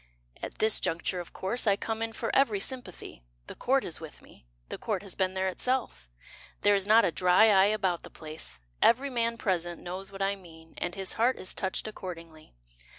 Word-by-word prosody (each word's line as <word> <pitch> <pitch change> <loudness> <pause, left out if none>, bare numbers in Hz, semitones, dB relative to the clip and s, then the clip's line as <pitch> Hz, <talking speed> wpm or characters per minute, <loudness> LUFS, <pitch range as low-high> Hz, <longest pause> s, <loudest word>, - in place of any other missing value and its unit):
At - - -6
this 220 0 +3
juncture 170 +2 -1
of 175 - -7
course 220 +5 -2
I 200 - +5
come 225 +2 -3
in 225 0 -1
for 230 - -2
every 230 -7 +4
sympathy: 195 - -4 0.2
The - - -8
Court 265 +1 +1
is 165 - -4
with 160 -2 -10
me, - - -19 0.2
The - - -6
Court 205 -3 -2
has 195 - -6
been 185 -1 0
there 190 0 0
itself; 235 - -1 0.5
There 205 - +5
is 200 -1 +1
not 225 +2 +7
a - - +2
dry 180 +6 +5
eye 195 0 +6
about 190 -5 0
the - - -11
place, 155 - -8 0.2
Every 265 +4 +4
man 235 -1 0
present 175 -5 -1
knows 185 +2 -6
what 195 0 -3
I 200 +1 +1
mean, 165 -4 -15
And 175 0 -3
his 195 -1 -1
heart 240 +3 +2
is 185 - -5
touched 190 +3 -3
accordingly. 165 - -9
195 Hz, 205 wpm, -29 LUFS, 175-225 Hz, 0.5 s, not